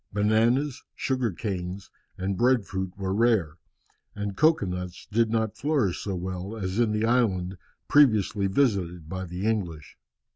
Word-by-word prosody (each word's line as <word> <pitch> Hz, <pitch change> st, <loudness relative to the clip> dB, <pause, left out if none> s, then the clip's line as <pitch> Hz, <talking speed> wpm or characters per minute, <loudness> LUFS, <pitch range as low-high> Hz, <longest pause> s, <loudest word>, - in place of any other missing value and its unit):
Bananas, 115 Hz, +7 st, +2 dB
sugar 130 Hz, -4 st, 0 dB
canes, 95 Hz, -1 st, -5 dB, 0.3 s
and 95 Hz, +1 st, -2 dB
bread 120 Hz, 0 st, +3 dB
fruit 95 Hz, -1 st, -3 dB
were 95 Hz, -1 st, -2 dB
rare, 100 Hz, -8 st, +2 dB, 0.6 s
and 105 Hz, -1 st, -4 dB
cocoa 155 Hz, -7 st, +4 dB
nuts 90 Hz, -1 st, -5 dB
did 115 Hz, +1 st, +2 dB
not 110 Hz, -1 st, 0 dB
flourish 140 Hz, -, 0 dB
so 100 Hz, -2 st, -3 dB
well 95 Hz, +4 st, -5 dB
as 95 Hz, +1 st, -2 dB
in 115 Hz, -3 st, +3 dB
the 105 Hz, +1 st, 0 dB
island 100 Hz, -7 st, +1 dB, 0.3 s
previously 110 Hz, -8 st, +4 dB
visited 95 Hz, -, 0 dB
by 95 Hz, +2 st, -4 dB
the 90 Hz, +3 st, -5 dB
English. 90 Hz, -9 st, -2 dB
100 Hz, 145 wpm, -26 LUFS, 95-115 Hz, 0.6 s, cocoa